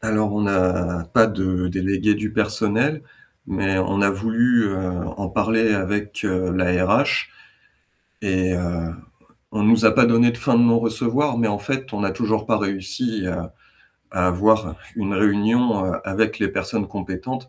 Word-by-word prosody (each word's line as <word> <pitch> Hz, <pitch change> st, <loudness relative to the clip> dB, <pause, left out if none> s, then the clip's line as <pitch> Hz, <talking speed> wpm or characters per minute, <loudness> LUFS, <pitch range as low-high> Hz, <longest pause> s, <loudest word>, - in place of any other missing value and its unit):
Alors, 110 Hz, -2 st, 0 dB
on 105 Hz, -, 0 dB
n'a 90 Hz, -3 st, 0 dB
pas 115 Hz, -, +7 dB
de 95 Hz, -4 st, -1 dB
délégué 95 Hz, +3 st, 0 dB
du 105 Hz, +1 st, -4 dB
personnel, 110 Hz, +7 st, 0 dB, 0.4 s
mais 95 Hz, 0 st, -1 dB
on 95 Hz, +2 st, 0 dB
a 100 Hz, -, +4 dB
voulu, 115 Hz, +4 st, +2 dB
heu, 100 Hz, -2 st, -1 dB, 0.4 s
en 100 Hz, -1 st, -4 dB
parler 110 Hz, +3 st, +1 dB
avec, 105 Hz, +2 st, -2 dB
heu, 95 Hz, -2 st, -1 dB
la 90 Hz, 0 st, 0 dB, 0.2 s
RH -, -, +2 dB, 0.9 s
et 95 Hz, -2 st, 0 dB
heu, 85 Hz, -2 st, -3 dB, 0.6 s
on 105 Hz, -1 st, -1 dB
nous 115 Hz, +1 st, +4 dB
a 110 Hz, -, +7 dB
pas -, -, +6 dB
donné 120 Hz, +1 st, +4 dB
de 120 Hz, -, -8 dB
fin 120 Hz, 0 st, +1 dB
de 120 Hz, -, +5 dB
non 115 Hz, -1 st, +4 dB
recevoir, 115 Hz, +4 st, 0 dB
mais 115 Hz, -1 st, +2 dB
en 105 Hz, -1 st, -2 dB
fait, 130 Hz, +4 st, -4 dB
on 105 Hz, -, -3 dB
n'a 100 Hz, -1 st, 0 dB
toujours 110 Hz, -2 st, -1 dB
pas 110 Hz, -1 st, +1 dB
réussi 100 Hz, +2 st, -3 dB
à 90 Hz, -2 st, -5 dB, 0.6 s
à 90 Hz, -1 st, +1 dB
avoir 105 Hz, +5 st, +2 dB, 0.2 s
une 100 Hz, -2 st, -2 dB
réunion, 105 Hz, +2 st, +2 dB
heu, 90 Hz, -, -1 dB
avec 110 Hz, +4 st, -1 dB
les 100 Hz, -, +1 dB
personnes 95 Hz, +2 st, -3 dB
compétentes. 100 Hz, +7 st, -6 dB
105 Hz, 170 wpm, -21 LUFS, 95-110 Hz, 0.9 s, pas